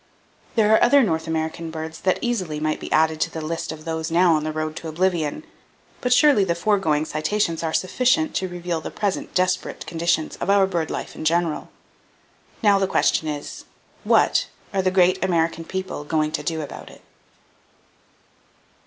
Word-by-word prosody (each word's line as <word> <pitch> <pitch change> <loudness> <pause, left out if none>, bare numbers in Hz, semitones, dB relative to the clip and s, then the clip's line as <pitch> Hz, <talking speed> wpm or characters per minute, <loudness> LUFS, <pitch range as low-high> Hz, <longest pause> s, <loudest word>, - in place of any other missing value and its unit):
There 220 -2 +4
are - - +5
other 280 +3 +6
North 160 -6 -1
American 160 +1 -3
birds 160 0 -7
that 185 - +2
easily 185 -11 -2
might 155 0 -1
be - - -8
added 160 0 +2
to - - +1
the 160 - -6
list 160 +1 -4
of 155 0 -9
those 160 0 -3
now 170 +1 +4
on 155 -1 +1
the 155 - -2
road 155 0 -3
to 165 - -6
oblivion; 170 - -1 0.6
but 250 - -1
surely 275 -5 +5
the 170 -3 0
foregoing 170 -5 +1
citations 165 +2 -1
are 165 -1 -2
sufficient 255 - +1
to 190 - -1
reveal 175 -2 -4
the - - -5
present 200 -3 -3
desperate 185 0 0
conditions 165 -1 -1
of - - -4
our 200 -1 +5
bird 170 -4 -2
life - - -5
in - - -7
general. 165 0 0 0.9
Now 200 -2 +5
the 195 - +1
question 160 - +1
is: 145 -1 -6 0.4
What - - +3 0.3
are 195 - +2
the 185 - +2
great 185 0 +3
American 165 -2 0
people 190 -5 -5
going 155 0 0
to 160 - -2
do 160 +1 -2
about 145 - -9
it? - - -16
170 Hz, 180 wpm, -23 LUFS, 160-190 Hz, 0.9 s, other